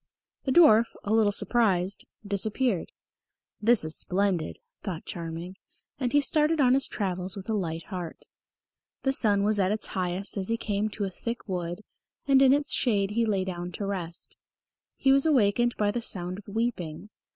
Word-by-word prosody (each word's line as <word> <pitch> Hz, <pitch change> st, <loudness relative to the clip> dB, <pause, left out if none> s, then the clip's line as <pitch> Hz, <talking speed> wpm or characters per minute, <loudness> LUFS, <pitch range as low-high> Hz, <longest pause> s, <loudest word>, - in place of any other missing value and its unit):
The 265 Hz, -, 0 dB
dwarf, 245 Hz, -8 st, +7 dB, 0.2 s
a 205 Hz, -, -1 dB
little 220 Hz, -2 st, +4 dB
surprised, 200 Hz, -4 st, +1 dB, 0.2 s
disappeared. 205 Hz, 0 st, -1 dB, 0.7 s
"This 225 Hz, -4 st, +4 dB
is 155 Hz, -, -4 dB
splendid," 185 Hz, -4 st, -1 dB, 0.2 s
thought 180 Hz, -6 st, -5 dB
Charming, 170 Hz, +2 st, -6 dB, 0.4 s
and 250 Hz, -3 st, -1 dB
he 290 Hz, -, +4 dB
started 305 Hz, +3 st, +2 dB
on 255 Hz, -3 st, +5 dB
his 270 Hz, +1 st, +2 dB
travels 185 Hz, -1 st, -3 dB
with 190 Hz, -, -8 dB
a -, -, +1 dB
light 165 Hz, -5 st, -2 dB
heart. 180 Hz, -3 st, -7 dB, 0.8 s
The 270 Hz, -, +2 dB
sun 205 Hz, -6 st, +3 dB
was 210 Hz, 0 st, +2 dB
at 190 Hz, 0 st, +2 dB
its 215 Hz, +1 st, 0 dB
highest 185 Hz, +2 st, -2 dB
as 190 Hz, -1 st, -2 dB
he 230 Hz, -, 0 dB
came 210 Hz, -1 st, -1 dB
to 210 Hz, -, -5 dB
a 195 Hz, -, -2 dB
thick 230 Hz, +6 st, -6 dB
wood, 175 Hz, 0 st, -3 dB, 0.5 s
and 270 Hz, -1 st, +5 dB
in 265 Hz, -1 st, +6 dB
its 285 Hz, +1 st, +2 dB
shade 205 Hz, -5 st, +1 dB
he 230 Hz, +1 st, +1 dB
lay 195 Hz, -3 st, 0 dB
down 175 Hz, -1 st, -5 dB
to 200 Hz, -, -4 dB
rest. 175 Hz, -4 st, -5 dB, 0.6 s
He 270 Hz, -, +3 dB
was 275 Hz, +3 st, +3 dB
awakened 240 Hz, -3 st, +2 dB
by 205 Hz, -1 st, +1 dB
the 240 Hz, +2 st, -3 dB
sound 185 Hz, -3 st, -1 dB
of 205 Hz, -, -15 dB
weeping. 205 Hz, -5 st, -3 dB
205 Hz, 175 wpm, -27 LUFS, 185-235 Hz, 0.8 s, dwarf